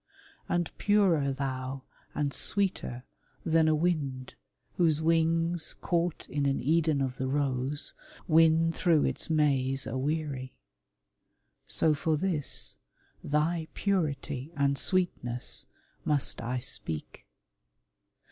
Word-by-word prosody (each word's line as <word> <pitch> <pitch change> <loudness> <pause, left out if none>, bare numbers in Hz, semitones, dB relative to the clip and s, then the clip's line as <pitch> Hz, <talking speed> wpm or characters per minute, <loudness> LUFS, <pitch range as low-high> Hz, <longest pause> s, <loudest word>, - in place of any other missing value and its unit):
And 175 -1 -1
purer 185 -9 +3
thou 130 -1 -4 0.3
and 145 -2 -1
sweeter 190 -11 0 0.4
than 160 -1 +3
a 155 - +4
wind 145 -6 -1 0.4
Whose 160 -4 +3
wings, 165 +1 +1
caught 175 -1 -1
in 140 -1 -1
an 135 - +1
Eden 155 0 +2
of 130 -1 -2
the 130 - -2
j*ose, 140 0 -1 0.3
Win 165 0 +5
through 165 -2 +2
its - - -2
maze 135 -4 +2
aweary. 135 -1 -3 1.1
So 160 - +3
for 155 +2 0
this, 160 -4 0 0.5
Thy 155 +2 0
purity 150 -7 -1
and 140 0 +2
sweetness, 135 -8 0 0.4
must 145 -4 +1
I 120 +2 -2
speak. 80 - -5
150 Hz, 105 wpm, -29 LUFS, 135-165 Hz, 1.1 s, Win